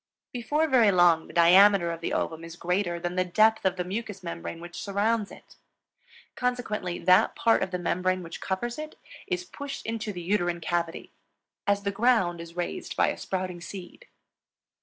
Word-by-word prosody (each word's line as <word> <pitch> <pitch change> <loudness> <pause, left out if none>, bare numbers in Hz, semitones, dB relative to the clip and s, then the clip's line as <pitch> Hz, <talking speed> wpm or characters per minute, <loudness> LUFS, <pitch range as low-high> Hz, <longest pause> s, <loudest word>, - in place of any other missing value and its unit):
Before 290 +6 0
very 240 -7 +5
long 175 -3 +4
the - - -13
diameter 180 +1 +6
of 165 0 -6
the - - -2
ovum 160 0 -2
is 165 0 -9
greater 175 0 -1
than 175 +1 -3
the 185 - +3
depth 215 +4 +3
of 190 -1 +2
the 180 - -2
mucous 200 +1 -5
membrane 170 -1 -6
which 175 0 -8
surrounds 205 +2 0
it. - - -15 0.8
Consequently 220 -8 -2
that 185 +2 +4
part 230 - +3
of 190 - -1
the 180 - -2
membrane 185 +1 -1
which 165 -1 -8
covers 240 +7 -3
it 310 0 -7 0.3
is 365 -2 -2
pushed 285 -5 -7
into 225 -1 -3
the 175 -3 -7
uterine 175 -2 0
cavity, 170 0 -3 0.6
as 200 0 +2
the 200 - 0
ground 200 -6 +2
is 170 0 -11
raised 180 - -4
by - - +4
a - - -2
sprouting 185 -2 -4
seed. 190 - -10
185 Hz, 180 wpm, -27 LUFS, 175-220 Hz, 0.8 s, diameter